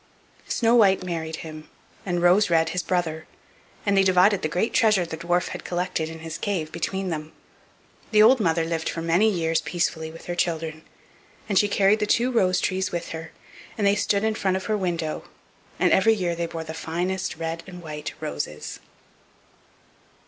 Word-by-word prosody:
Snow 230 0 +2
white 200 -6 +5
married 165 -3 -3
him, 155 -1 -9 0.4
and 175 -1 0
Rose 180 +4 +5
red 165 -1 +3
his 180 - -1
brother, 165 -4 -2 0.6
and 200 -1 +2
they 195 - +6
divided 190 +1 +4
the - - 0
great 180 +9 -1
treasure 210 -6 +4
the 165 - -5
dwarf 175 +2 0
had - - -7
collected 175 -2 -2
in 160 0 -9
his 160 -1 -6
cave 175 -7 -2
between 190 +3 -3
them. 155 -1 -5 0.8
The 215 -1 +6
old 250 +4 +6
mother 165 -4 +1
lived 165 -1 -2
for 165 - -4
many 175 +7 +3
years 165 -4 0
peacefully 160 -2 -2
with 165 +1 -12
her 175 - -3
children; 160 -2 -2 0.7
and 200 -3 +3
she 205 - +3
carried 200 +1 +3
the 210 - 0
two 240 +4 +2
rose 185 -6 +2
trees 190 0 -1
with 170 -1 -4
her, 160 0 -7 0.5
and 210 - 0
they 200 - +5
stood 205 0 +1
in 220 0 +1
front 190 -3 0
of 190 - -6
her 215 - 0
window, 170 -5 -2 0.5
and - - +3
every 220 +4 +5
year 180 -4 -1
they 170 0 -2
bore 165 -1 -5
the 160 0 -7
finest 175 +4 -2
red 165 0 -3
and 180 -2 -10
white 150 -2 -6
roses. 145 - -5
175 Hz, 185 wpm, -24 LUFS, 160-195 Hz, 0.8 s, they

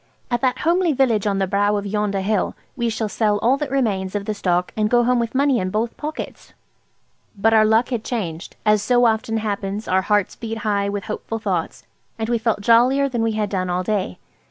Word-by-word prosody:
"At 240 - 0
that 255 -1 +1
homely 345 0 +2
village 235 -6 +2
on 200 -1 +1
the 195 - +1
brow 205 +2 +1
of 200 - -4
yonder 205 -1 -1
hill 205 0 0 0.2
we 235 -3 0
shall 220 0 -2
sell 210 0 +1
all 240 +5 +3
that 295 -1 -3
remains 210 -8 -1
of 200 -1 -2
the 215 - -1
stock, 180 -3 0
and 215 -1 +1
go 240 0 +4
home 250 0 +2
with 230 +1 -3
money 275 -2 +3
in 185 -1 -2
both 220 +4 -2
pockets." 305 +1 -7 0.8
But 225 +3 +3
our 215 -1 +6
luck 220 +3 +3
had 240 -4 -2
changed. 185 -8 -4
As 210 -1 +4
so 245 +2 +3
often 225 0 +1
happens, 205 -1 -3
our 185 +1 +2
hearts 205 0 +1
beat 225 -1 -5
high 200 -1 +1
with 200 -1 -3
hopeful 225 +2 -4
thoughts, 190 -7 -3 0.3
and 225 0 -3
we 235 -1 +1
felt 220 -2 0
jollier 250 +6 +4
than 240 -4 -2
we 225 -1 +1
had 215 -2 -2
done 185 -2 -1
all 180 +1 0
day. 190 - -2
215 Hz, 220 wpm, -21 LUFS, 200-240 Hz, 0.8 s, our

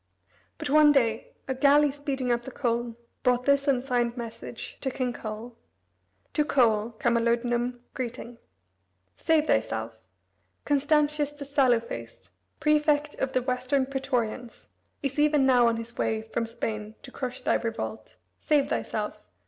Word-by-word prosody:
But 255 - -4
one 300 0 +7
day 230 -5 +1
a 265 - 0
galley 285 +2 +4
speeding 270 -3 -2
up 235 0 +1
the 240 - -8
Colne 240 -2 -2 0.3
brought 250 -1 +2
this 280 0 +3
unsigned 245 -3 +1
message 230 -1 -7
to 270 - -1
King 255 -1 -2
Coel: 225 +1 -7 0.8
"To 300 - +3
Coel, 230 -5 +2
Camalodunum, 240 0 +1
Greeting: 240 -1 -6 0.8
"Save 315 -2 +2
thyself. 110 - -1 0.7
Constantius 295 0 +2
the 290 -1 -8
sallow 265 -4 +3
faced, 115 - -9 0.3
prefect 300 -1 +2
of 265 0 -1
the 255 - +1
Western 255 +1 0
praetorians, 250 -3 -3 0.3
is 275 +1 -2
even 295 -2 +4
now 250 -2 +5
on 230 0 +1
his 230 +1 -7
way 220 0 0
from 225 +1 -3
Spain 220 -2 -4
to 260 - -10
crush 255 -2 -5
thy - - +2
revolt. 230 -1 -4 0.2
Save 295 -2 +2
thyself. - - -3
250 Hz, 140 wpm, -27 LUFS, 235-280 Hz, 0.8 s, one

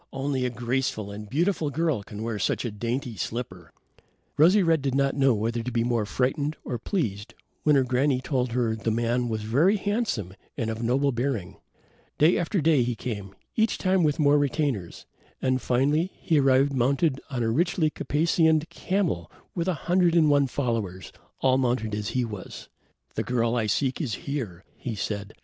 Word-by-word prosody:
Only 135 -1 -1
a - - +1
graceful 120 -3 -2
and 105 0 -8
beautiful 165 - +1
girl 155 -4 0
can 105 +2 -8
wear 115 -2 -3
such 100 - 0
a 120 - -2
dainty 120 +4 -3
slipper." 95 -6 -5 0.6
Rosy 185 +7 +5
red 165 -3 +3
did 135 -1 -1
not 140 0 +2
know 135 -3 +4
whether 115 +3 -1
to 125 +2 -4
be 115 -1 +1
more 115 -3 0
frightened 145 +6 -1
or 120 -3 -3
pleased, 110 - -3 0.3
when 150 -1 +4
her 135 - +4
granny 130 +1 +1
told 130 -3 -1
her 120 -3 +1
the 110 +1 -2
man 120 +2 0
was 110 -1 -2
very 150 - +3
handsome 200 - -2 0.2
and 115 -1 -1
of 110 +1 -5
noble 135 +4 +2
bearing. 115 -7 -2 0.6
Day 160 +4 +5
after 180 +3 0
day 155 -3 +4
he 120 0 0
came, 105 -5 -6 0.2
each 220 0 +2
time 185 -1 +2
with 150 -2 +2
more 145 -1 +4
retainers, 140 - -1 0.3
and, 130 -1 0
finally, 145 +8 +1
he 160 -3 +1
arrived 135 +1 +4
mounted 135 +3 +1
on 125 -4 -2
a 115 - +1
richly 160 +3 +1
caparisoned 160 +1 +2
camel 170 - -1 0.2
with 170 -1 -2
a 185 - +1
hundred 175 -1 +3
and 155 -3 +5
one 140 -1 +4
followers, 115 -9 -3 0.3
all 130 0 +3
mounted 120 -4 0
as 105 0 -2
he 125 - +2
was. 105 -4 -8 0.4
"The - - -1
girl 120 -1 0
I 115 -3 0
seek 130 - 0
is 120 -10 -2
here," 115 -11 -4
he 120 -3 -5
said. 100 0 -4
130 Hz, 180 wpm, -26 LUFS, 115-150 Hz, 0.6 s, Rosy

